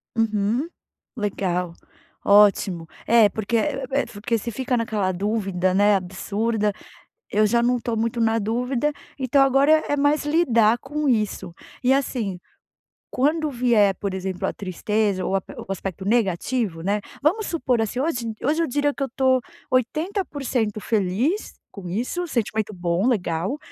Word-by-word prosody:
Uhum, 225 Hz, +5 st, +1 dB, 0.5 s
legal 180 Hz, -5 st, -2 dB, 0.5 s
ótimo, 200 Hz, -4 st, +4 dB, 0.2 s
é 225 Hz, -3 st, +6 dB
porque 220 Hz, +3 st, -1 dB
é 270 Hz, +1 st, -1 dB
porque 225 Hz, +2 st, -2 dB
você 235 Hz, +3 st, -5 dB
fica 255 Hz, +2 st, -1 dB
naquela 210 Hz, -4 st, 0 dB
dúvida, 190 Hz, -2 st, -1 dB
né, 205 Hz, +1 st, +4 dB
absurda, 205 Hz, +4 st, -1 dB, 0.6 s
eu 215 Hz, +1 st, +3 dB
já 235 Hz, +2 st, +2 dB
não 245 Hz, +1 st, +2 dB
estou 230 Hz, -1 st, -3 dB
muito 230 Hz, +1 st, -1 dB
na 225 Hz, 0 st, +2 dB
dúvida, 250 Hz, +6 st, -1 dB, 0.3 s
então 270 Hz, +1 st, +3 dB
agora 270 Hz, +3 st, +4 dB, 0.2 s
é 290 Hz, -, +1 dB
mais 290 Hz, +1 st, +2 dB
lidar 240 Hz, -8 st, +3 dB
com 295 Hz, +1 st, -3 dB
isso. 210 Hz, -6 st, 0 dB, 0.3 s
E 255 Hz, +1 st, +4 dB
assim, 235 Hz, -9 st, -1 dB, 0.7 s
quando 305 Hz, +3 st, +1 dB
vier, 235 Hz, -6 st, +3 dB
por 200 Hz, -2 st, -3 dB
exemplo, 190 Hz, -1 st, -3 dB
a -, -, -1 dB
tristeza 200 Hz, +1 st, -1 dB
ou 195 Hz, -, -1 dB
ape 190 Hz, -, -2 dB
ou -, -, -8 dB
aspecto 195 Hz, 0 st, -4 dB
negativo, 205 Hz, -2 st, 0 dB
né, 205 Hz, +3 st, 0 dB, 0.2 s
vamos 390 Hz, +9 st, +2 dB
supor 255 Hz, -8 st, 0 dB
assim 220 Hz, +3 st, -3 dB
hoje 250 Hz, -6 st, -1 dB
hoje 310 Hz, +5 st, +2 dB
eu 325 Hz, -, 0 dB
diria 290 Hz, +2 st, +1 dB
que 275 Hz, -, -5 dB
eu 270 Hz, -, 0 dB
estou 260 Hz, 0 st, +2 dB, 0.3 s
80% 265 Hz, -, -1 dB
feliz 225 Hz, -, 0 dB, 0.2 s
com 190 Hz, -4 st, -8 dB
isso 250 Hz, -, -2 dB
sentimento 220 Hz, -4 st, -1 dB
bom 175 Hz, +4 st, 0 dB
legal, 185 Hz, -, -1 dB
225 Hz, 145 wpm, -23 LUFS, 200-265 Hz, 0.7 s, é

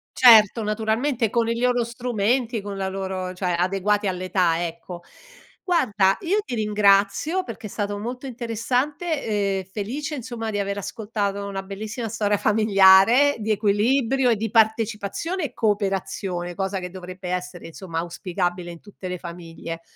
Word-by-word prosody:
Certo 225 Hz, -3 st, +7 dB
naturalmente 220 Hz, +3 st, 0 dB
con 230 Hz, -1 st, +1 dB
i 230 Hz, -, -1 dB
loro 245 Hz, -1 st, +2 dB
strumenti, 235 Hz, -1 st, -1 dB
con 200 Hz, -1 st, -6 dB
la 190 Hz, 0 st, -2 dB
loro 190 Hz, -1 st, -4 dB
cioè 180 Hz, -2 st, -1 dB
adeguati 195 Hz, +3 st, +1 dB
all'età, 180 Hz, -2 st, 0 dB
ecco. 170 Hz, +1 st, -7 dB, 0.6 s
Guarda, 210 Hz, -, +2 dB
io 385 Hz, +4 st, +1 dB
ti -, -, -6 dB
ringrazio 210 Hz, -, +2 dB
perché 230 Hz, -, -8 dB
è -, -, -5 dB
stato 205 Hz, 0 st, -3 dB
molto 250 Hz, +5 st, -5 dB
interessante, 255 Hz, +7 st, -2 dB, 0.4 s
ehm, -, -, -5 dB
felice 225 Hz, -, -5 dB
insomma 235 Hz, -3 st, -5 dB
di 205 Hz, -, -2 dB
aver 200 Hz, 0 st, -2 dB
ascoltato 200 Hz, -1 st, -3 dB
una 195 Hz, -1 st, -4 dB
bellissima 215 Hz, +4 st, -5 dB
storia 210 Hz, -2 st, 0 dB
familiare, 215 Hz, +5 st, +5 dB
di 220 Hz, 0 st, -4 dB
equilibrio, 235 Hz, +5 st, +2 dB, 0.2 s
partecipazione 225 Hz, -, +1 dB
e 250 Hz, -, -6 dB
cooperazione, 195 Hz, -4 st, -1 dB
cosa 195 Hz, +1 st, -2 dB
che 180 Hz, -, -6 dB
dovrebbe 185 Hz, 0 st, -8 dB
essere 180 Hz, -1 st, -4 dB
insomma 165 Hz, 0 st, -6 dB
auspicabile 175 Hz, 0 st, -3 dB
in 170 Hz, -, -12 dB
tutte 200 Hz, -2 st, -10 dB
le 180 Hz, -, -4 dB
famiglie. 165 Hz, -1 st, -8 dB
205 Hz, 140 wpm, -23 LUFS, 190-235 Hz, 0.6 s, Certo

